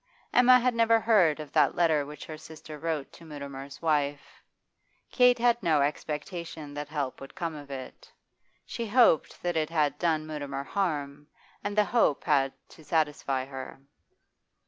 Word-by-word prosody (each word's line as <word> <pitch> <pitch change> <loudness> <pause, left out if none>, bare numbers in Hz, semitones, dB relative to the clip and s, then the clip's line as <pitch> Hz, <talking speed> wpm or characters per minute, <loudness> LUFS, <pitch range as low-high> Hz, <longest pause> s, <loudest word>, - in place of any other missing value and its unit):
Emma 250 0 +6
never 230 -1 +3
heard 200 -9 +3
of 150 -2 -8
that - - +3
letter 160 -4 +3
which 150 +1 -9
her 155 - -7
sister 155 -1 -11
wrote 160 -4 -3
to - - -14
Mutimer's 140 -2 -9
wife. 145 -2 -1 0.7
Kate 250 -1 +5
had 240 0 +2
no 160 -5 +3
expectation 150 +1 -4
that 145 0 -5
help 145 -4 -3
would 135 - -11
come 170 -3 -3
of 145 -2 -10
it; 130 -2 -9 0.5
she 235 -1 -5
hoped 220 - +3
that 175 -1 -1
it 155 -1 0
had 155 -3 0
done 160 -3 +1
Mutimer 145 -3 -5
harm, 145 -5 -3 0.4
and 205 0 -3
the 210 - +5
hope 225 - +2
had 135 -1 +2 0.2
to 160 - -16
satisfy 145 -4 0
her. 135 -1 -8
155 Hz, 155 wpm, -28 LUFS, 145-175 Hz, 0.7 s, Emma